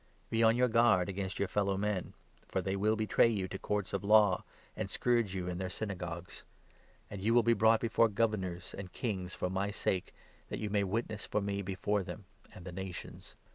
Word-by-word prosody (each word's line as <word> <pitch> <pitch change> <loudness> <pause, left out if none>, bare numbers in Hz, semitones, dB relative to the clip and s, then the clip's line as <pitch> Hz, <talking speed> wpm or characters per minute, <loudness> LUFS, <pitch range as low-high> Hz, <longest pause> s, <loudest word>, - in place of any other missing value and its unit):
Be 115 - +2
on 115 0 +5
your 125 0 +4
guard 115 -6 +4
against 95 0 -3
your 100 - 0
fellow 100 -1 0
men, 105 -2 -2 0.3
for - - -1
they 95 +1 -1
will 105 +3 +2
betray 110 +1 +3
you 100 -5 -1
to 95 - -6
courts 105 -2 -2
of - - -1
law, 105 -3 +5 0.3
and - - -3
scourge 120 -6 +1
you 90 -1 -3
in 90 -1 -3
their 95 - -2
Syna 100 +1 -4
gogues; 85 -1 -7 0.7
and 100 -2 -6
you 115 +4 +2
will 120 - +6
be 115 +1 +4
brought 110 +1 +4
before 115 0 +3
governors 100 -5 -1
and 95 -2 -7
kings 95 -7 -3
18 - - -8
for 90 - -1
my 95 +2 0
sake, 95 -2 -1 0.4
that - - -3
you 105 -2 -3
may 100 -1 +2
witness 110 +2 -2
for - - 0
me 100 0 -2
before 100 +2 -1
them 95 +2 -8 0.3
and 90 - -12
the 90 - -6
nations. 95 0 -7
100 Hz, 215 wpm, -33 LUFS, 95-110 Hz, 0.7 s, will